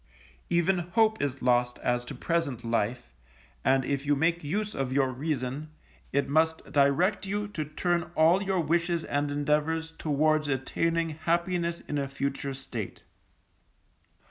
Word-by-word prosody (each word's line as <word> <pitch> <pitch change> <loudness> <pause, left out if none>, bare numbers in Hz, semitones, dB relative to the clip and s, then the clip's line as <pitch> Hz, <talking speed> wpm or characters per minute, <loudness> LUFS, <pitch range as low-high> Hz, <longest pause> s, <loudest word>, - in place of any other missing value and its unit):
Even 175 +2 +2
hope 220 +5 +2
is 140 -2 -2
lost 125 0 +2
as 120 0 +1
to 135 - -6
present 140 -5 -1
life, 115 - -1 0.5
and 130 0 +3
if 140 -1 -1
you 145 0 +2
make 165 +4 +1
use 210 +8 -2
of 135 -2 -2
your 135 -1 +2
reason, 140 +1 -3 0.4
it 140 +1 +1
must 160 +2 +2
direct 150 +9 +3
you 205 +1 -1
to 165 -7 -3
turn 170 +3 -1
all 165 +5 +5
your 190 -2 +1
wishes 170 +1 +1
and 145 0 -1
endeavours 150 +3 0
towards 155 -1 +1
attaining 165 +5 0
happiness 170 +2 -1
in 145 - -3
a 140 - -1
future 140 0 -3
state. 120 -6 -6
150 Hz, 145 wpm, -28 LUFS, 135-170 Hz, 0.5 s, all